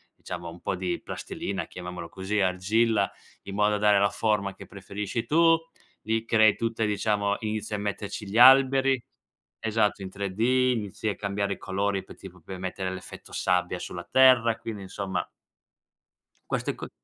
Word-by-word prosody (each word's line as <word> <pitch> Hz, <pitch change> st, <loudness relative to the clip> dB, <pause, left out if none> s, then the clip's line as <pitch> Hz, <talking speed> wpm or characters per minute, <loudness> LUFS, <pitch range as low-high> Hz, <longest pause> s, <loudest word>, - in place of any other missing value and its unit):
diciamo, 85 Hz, -2 st, -7 dB
un 85 Hz, +1 st, -12 dB
po' -, -, -2 dB
di 90 Hz, -1 st, -2 dB
plastilina, 95 Hz, -1 st, -5 dB
chiamiamolo 90 Hz, -1 st, -7 dB
così, 95 Hz, +4 st, -2 dB
argilla, 100 Hz, +3 st, +2 dB, 0.3 s
in 100 Hz, -, -8 dB
modo 105 Hz, +1 st, +2 dB
da -, -, +1 dB
dare 105 Hz, -1 st, +4 dB
la 100 Hz, 0 st, +3 dB
forma 100 Hz, -3 st, 0 dB
che -, -, -11 dB
preferisci 105 Hz, +3 st, -5 dB
tu. 165 Hz, +3 st, +5 dB, 0.4 s
Gli 110 Hz, +1 st, -1 dB
crei 110 Hz, -2 st, +5 dB
tutte 115 Hz, -1 st, -1 dB
diciamo, 100 Hz, -1 st, 0 dB
inizia 110 Hz, -1 st, -3 dB
a -, -, -3 dB
metterci 100 Hz, 0 st, -4 dB
gli 100 Hz, +3 st, -3 dB
alberi. 135 Hz, +1 st, +7 dB, 0.6 s
Esatto, 110 Hz, -2 st, +1 dB
in 95 Hz, -, -5 dB
3D 100 Hz, 0 st, -5 dB, 0.4 s
inizi 105 Hz, -1 st, -4 dB
a 100 Hz, -, -2 dB
cambiare 100 Hz, 0 st, -2 dB
i -, -, -9 dB
colori, 100 Hz, 0 st, -1 dB
poi -, -, -13 dB
tipo 95 Hz, -1 st, -12 dB
puoi 95 Hz, +4 st, -8 dB
mettere 95 Hz, 0 st, -3 dB
l'effetto 95 Hz, 0 st, -9 dB
sabbia 90 Hz, 0 st, 0 dB
sulla 90 Hz, -1 st, -7 dB
terra. 125 Hz, -4 st, +5 dB
Quindi, 115 Hz, -3 st, -6 dB
insomma 95 Hz, 0 st, -3 dB, 1.3 s
queste -, -, -1 dB
co -, -, -8 dB
100 Hz, 160 wpm, -27 LUFS, 95-110 Hz, 1.3 s, alberi